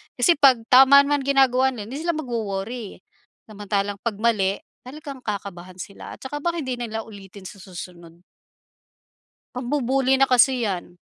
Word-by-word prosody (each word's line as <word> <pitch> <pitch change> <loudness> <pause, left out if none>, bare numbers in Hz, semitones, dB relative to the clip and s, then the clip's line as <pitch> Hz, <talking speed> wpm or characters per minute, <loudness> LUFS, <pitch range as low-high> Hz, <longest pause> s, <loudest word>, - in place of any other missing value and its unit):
Kasi 285 +6 +3
'pag 265 -5 +5
tama 270 +2 +8
man 290 0 0
ginagawa 265 -1 +3
nila 210 -2 -8
hindi 275 +4 -6
sila 340 - 0
magwo-worry, 225 -6 -5 0.5
samantalang 205 -1 -3
'pag 230 -3 -2
mali, 200 -4 +1 0.3
talagang 275 0 -10
kakabahan 185 -3 -6
sila 200 - -9
at - - -46
saka 290 +2 -7
baka 340 -1 -1
hindi 260 -4 -3
nila 225 -2 -5
ulitin 195 -2 -12
sa - - -11
susunod. 175 -3 -11 1.4
Pambu-bully 265 +1 0
na 270 - +4
kasi 250 -2 +3
yan. 175 -2 -5
240 Hz, 145 wpm, -23 LUFS, 200-270 Hz, 1.4 s, tama